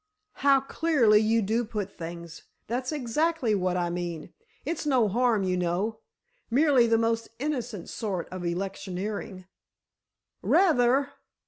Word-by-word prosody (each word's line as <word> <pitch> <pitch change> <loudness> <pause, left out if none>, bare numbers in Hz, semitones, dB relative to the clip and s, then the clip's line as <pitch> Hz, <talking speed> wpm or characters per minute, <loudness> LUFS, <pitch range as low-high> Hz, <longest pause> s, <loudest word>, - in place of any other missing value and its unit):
"How 275 -1 +4
clearly 270 -7 +3
you 225 +1 +2
do 225 +4 0
put 210 -3 -5
things! 170 0 -8 0.2
That's 250 +4 -3
exactly 300 -1 0
what 185 -2 0
I 175 -1 -1
mean. 175 -2 -5 0.3
It's 330 -2 -3
no 255 -6 +3
harm, 230 0 +2
you 185 -1 0
know—merely 235 - 0
the 225 0 +3
most 230 0 0
innocent 245 - -3
sort 195 -6 -4
of 185 -1 -6
electioneering——" 190 +2 -4 1.0
"Rather!" 275 -5 +3
225 Hz, 120 wpm, -27 LUFS, 185-260 Hz, 1.0 s, How